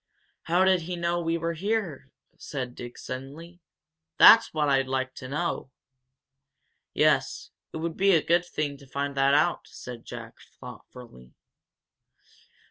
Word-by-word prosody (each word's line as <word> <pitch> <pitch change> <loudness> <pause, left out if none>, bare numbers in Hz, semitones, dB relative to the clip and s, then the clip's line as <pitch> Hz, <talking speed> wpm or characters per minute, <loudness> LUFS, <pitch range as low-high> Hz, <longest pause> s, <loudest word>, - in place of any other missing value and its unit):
"How 175 +3 +3
did 190 -2 +3
he 175 +2 -5
know 170 0 -1
we 165 0 -1
were 170 0 -2
here?" 180 -6 -3 0.3
said 130 -4 -5
Dick, 120 0 -9
suddenly. 145 +7 -8 0.6
"That's - - +8
what 150 -2 0
I'd 135 -1 +2
like 130 0 -2
to 130 - -7
know!" 150 0 -3 1.3
"Yes, - - +1 0.2
it - - -6
would 165 0 -4
be 195 0 +4
a 160 - +3
good 170 +1 +3
thing 145 -4 -3
to 140 -1 -16
find 140 +1 -3
that 135 0 +3
out," 175 +4 +1
said 120 -2 -10
Jack, - - -9 0.2
thoughtfully. 65 - -13
150 Hz, 140 wpm, -26 LUFS, 135-170 Hz, 1.3 s, That's